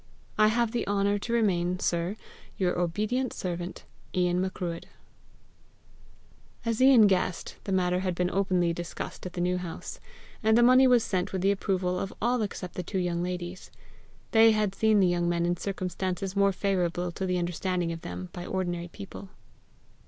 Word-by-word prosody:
I 215 0 +5
have 235 +1 +1
the 240 - -2
honour 200 0 +1
to 230 - -5
remain, 180 -6 +1
sir, 175 +3 0 0.4
your 180 -2 0
obedient 215 +9 -1
servant, 175 -1 -5 0.3
Ian 180 0 +2
Macruadh." 180 -3 -3 1.8
As 230 +1 0
Ian 260 -4 +8
guessed, 185 -3 0
the 195 - -3
matter 180 -1 +2
had 185 -1 -1
been 180 +1 0
openly 185 -3 +1
discussed 175 +2 -6
at 180 - -9
the 175 - -3
New 180 +1 +1
House; 175 -2 -7 0.4
and 220 0 +4
the 240 - +6
money 255 +2 +7
was 245 -2 +5
sent 185 -2 -1
with 185 -1 -2
the 195 - +4
approval 185 -2 -1
of 195 - -3
all 240 +2 +1
except 195 -3 -4
the - - -3
two 190 +3 -4
young 175 -2 0
ladies. 180 0 -5 0.6
They 225 0 +7
had 210 -2 0
seen 215 0 +3
the 185 - +5
young 175 -1 +1
men 170 0 +1
in 175 0 +1
circumstances 185 0 -3
more 200 0 +4
favourable 180 -2 -1
to 190 +2 -3
the 180 0 0
understanding 175 0 -1
of 165 0 -6
them 90 - -6
by 175 - -6
ordinary 175 -2 -2
people. 195 +1 -10
185 Hz, 175 wpm, -28 LUFS, 175-205 Hz, 1.8 s, Ian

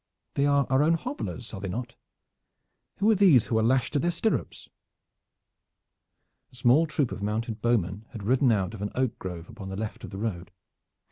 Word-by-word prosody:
They 140 +1 +2
are 140 -1 +3
our 130 +1 +4
own 160 +3 +4
hobblers, 205 - -5
are 95 - -6
they 95 - -4
not? 120 +5 -4
And - - -25 1.0
who 215 +2 +5
are - - +4
these 180 - +6
who 110 - +1
are - - +2
lashed 125 +2 +2
to 145 - +2
their 170 - +1
stirrups?" 185 +5 -2 1.8
A - - -17
small 130 +6 +4
troop 145 -5 0
of - - -6
mounted 110 +1 -2
bowmen 110 -3 0
had 110 -5 -8
ridden 125 +3 +3
out 100 -1 0
of 105 - -8
an 105 - -2
oak 130 -2 -1
grove 90 -2 -6
upon 95 -4 -9
the 95 - -5
left 110 +1 -5
of - - -7
the 95 - -8
road. 95 -5 -3
115 Hz, 200 wpm, -27 LUFS, 105-140 Hz, 1.8 s, these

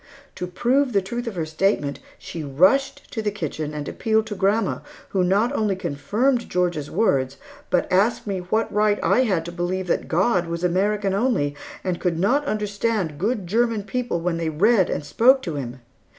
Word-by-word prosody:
To 180 - -5
prove 250 +8 +1
the 200 - +3
truth 240 +5 -4
of 225 - -4
her 165 -3 -2
statement, 155 -3 0 0.2
she 165 - -7
rushed 185 - +2
to 225 - -3
the 215 - 0
kitchen 155 -6 -4
and 150 -1 -5
appealed 220 0 +1
to 215 -2 -5
grandma, 200 +2 +1 0.3
who 190 -2 +1
not 200 +7 +2
only 215 -7 +1
confirmed 210 - 0
Georgia's 175 -5 -1
words, 135 - +1 0.3
but 180 - +1
asked 200 +6 +2
me 195 -3 -2
what 215 +6 -1
right 210 0 +3
I - - +3
had 180 -7 0
to 170 - -5
believe 180 +2 -2
that 175 - -1
God 180 +1 +2
was 170 +1 -4
American 195 +3 +1
only, 195 - +1 0.3
and 180 -2 -2
could 175 -3 0
not 245 - +2
understand 210 - -1
good 210 +1 -1
German 225 +2 +1
people 245 -3 -2
when 170 -1 -1
they 165 -1 -1
read 190 +5 +3
and 145 - -3
spoke 260 - +4
to 165 - -3
Him? 130 -3 -5
190 Hz, 185 wpm, -23 LUFS, 170-220 Hz, 0.3 s, spoke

